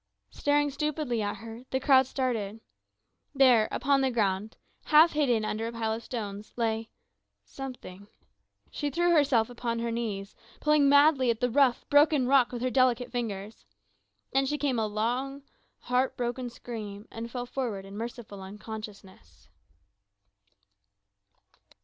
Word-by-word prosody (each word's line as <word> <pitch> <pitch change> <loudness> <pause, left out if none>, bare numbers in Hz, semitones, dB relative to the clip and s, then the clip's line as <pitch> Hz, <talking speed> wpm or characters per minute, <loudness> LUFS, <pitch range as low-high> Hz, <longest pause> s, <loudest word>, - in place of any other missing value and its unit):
Staring 290 0 +1
stupidly 285 -4 -2
at 205 0 -2
her, 225 +2 -9
the 265 - 0
crowd 265 -1 +5
separated. 225 -6 -2 0.8
There 250 -5 +5
upon 275 +2 +1
the 265 - +2
ground, 210 -2 -1 0.3
half 315 +2 +6
hidden 245 -8 +1
under 220 +1 -2
a - - -4
pile 225 -1 -2
of 225 - -5
stones, 210 -4 -6
lay 225 -1 -1 0.6
something. 245 -8 -9 0.6
She 290 - -2
threw 345 +5 +1
herself 275 -8 +3
upon 240 -1 -3
her 230 0 -2
knees, 210 -4 -4 0.3
pulling 300 -2 +4
madly 285 -2 +5
at 230 -1 0
the 245 -1 0
rough, 260 -1 +3
broken 290 -2 +4
rock 260 -1 +4
with 245 -1 -5
her 255 - 0
delicate 255 -2 +2
fingers. 215 -4 -5 0.7
Then 270 0 +2
she 295 +2 -1
gave 280 -2 0
a 220 - 0
long, 250 +6 -2 0.4
heart 255 +1 0
broken 245 +1 -3
scream 215 -4 -8
and 230 +1 -6
fell 245 +1 -4
forward 240 -7 -4
in 195 +1 -10
merciful 225 -3 -7
unconsciousness. 200 - -10
240 Hz, 140 wpm, -28 LUFS, 220-270 Hz, 0.8 s, half